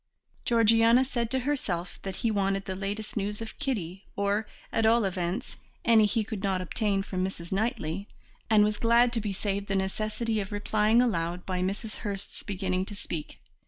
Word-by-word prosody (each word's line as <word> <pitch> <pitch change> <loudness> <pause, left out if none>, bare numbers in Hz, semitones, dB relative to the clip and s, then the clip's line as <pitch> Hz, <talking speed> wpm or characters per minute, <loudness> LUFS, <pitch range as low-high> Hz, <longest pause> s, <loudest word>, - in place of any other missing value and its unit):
Georgiana 230 +2 +5
said 240 -3 -1
to 265 - +1
herself 200 -11 -2
that 195 -1 -5
he 225 - +4
wanted 195 -1 0
the 190 - -3
latest 205 +3 -4
news 205 0 -2
of 225 0 -7
Kitty, 195 - -3
or, 200 +2 0 0.2
at 225 - +1
all 225 0 +5
events, 185 +5 -2 0.3
any 225 -2 +6
he 225 +1 +1
could 215 -2 -5
not 195 -2 +1
obtain 195 +2 0
from 185 -2 -2
Mrs. 175 -3 -5
Knightley, 200 - -1 0.4
and 215 -2 +6
was 210 0 +1
glad 235 +1 +4
to 230 - 0
be 205 -1 -2
saved 200 +1 -2
the 195 - 0
necessity 215 +3 -1
of 200 0 -4
replying 215 +3 +3
aloud 175 -5 -1
by 185 -1 -1
Mrs. 200 +4 -2
Hurst's 200 -2 -4
beginning 185 -2 -1
to 205 - -6
speak. 165 -6 -6
205 Hz, 180 wpm, -28 LUFS, 190-225 Hz, 0.4 s, any